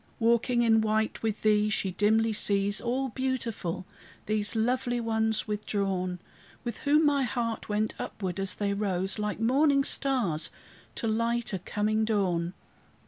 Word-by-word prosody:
Walking 235 +1 +2
in 225 -1 +4
white 220 0 0
with 220 -2 -2
thee, 210 0 +3
she 195 -3 -1
dimly 220 +4 +2
sees, 200 -1 +2
All 260 +3 -1
beautiful, 230 -9 -3 0.4
these 215 +1 +1
lovely 245 +2 0
ones 220 -1 0
withdrawn, 195 -3 -2 0.5
With 240 -1 -5
whom 300 +2 +3
my 285 -1 +3
heart 235 -4 -2
went 210 +1 0
upward, 185 -3 -4
as 195 -1 -2
they 200 -1 -1
rose, 195 -1 -1
Like 210 0 -2
morning 275 +4 +3
stars, 245 - +2 0.5
to 230 - -2
light 230 +1 0
a 190 - -1
coming 215 +4 0
dawn. 185 -5 0
220 Hz, 140 wpm, -28 LUFS, 200-235 Hz, 0.5 s, in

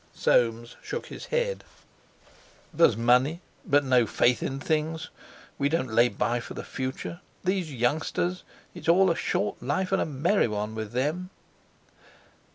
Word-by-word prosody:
Soames 115 0 +1
shook 475 - -5
his - - -9
head. - - -1 1.1
"There's 165 -10 +4
money, 125 +7 +3 0.2
but 145 0 +3
no 125 -3 +4
faith 120 +4 +2
in 135 0 -3
things. 160 +2 -2 0.5
We 140 0 +2
don't 145 -8 -1
lay 120 +2 +5
by 120 0 -1
for - - -8
the - - -5
future. 130 +6 -5 0.2
These 185 -3 -1
youngsters—it's 155 +8 -2
all 185 +1 +5
a - - 0
short 105 - -1
life 145 +9 -1
and - - +2
a - - +1
merry 155 +7 +2
one 105 0 -3
with 110 -1 -5
them." 155 +9 -1
140 Hz, 145 wpm, -27 LUFS, 120-170 Hz, 1.1 s, lay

